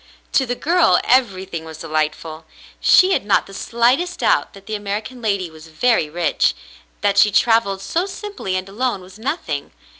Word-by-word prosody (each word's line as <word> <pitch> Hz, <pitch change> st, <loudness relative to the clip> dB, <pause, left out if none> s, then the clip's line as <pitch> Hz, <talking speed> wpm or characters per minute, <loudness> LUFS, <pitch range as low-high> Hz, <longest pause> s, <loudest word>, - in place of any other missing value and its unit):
To 265 Hz, -, +2 dB
the 245 Hz, -, -1 dB
girl 340 Hz, +6 st, +3 dB
everything 190 Hz, -9 st, +1 dB
was 160 Hz, -1 st, -10 dB
delightful. 155 Hz, 0 st, -3 dB, 0.3 s
She 375 Hz, +1 st, +5 dB
had -, -, +1 dB
not 205 Hz, -, +2 dB
the 195 Hz, -, -13 dB
slightest 245 Hz, -, 0 dB
doubt -, -, +2 dB
that 195 Hz, -1 st, -14 dB
the 220 Hz, -, -6 dB
American 210 Hz, +4 st, -4 dB
lady 200 Hz, -6 st, -1 dB
was 160 Hz, 0 st, -13 dB
very 160 Hz, 0 st, +1 dB
rich. 175 Hz, +3 st, +1 dB, 0.5 s
That 200 Hz, -1 st, +2 dB
she 210 Hz, -, +6 dB
travelled 210 Hz, -2 st, +2 dB
so 350 Hz, +4 st, -1 dB
simply 400 Hz, -, -5 dB
and 185 Hz, +1 st, -3 dB
alone 230 Hz, +1 st, -2 dB
was 185 Hz, +3 st, -14 dB
nothing. 220 Hz, -, -3 dB
200 Hz, 170 wpm, -20 LUFS, 175-245 Hz, 0.5 s, she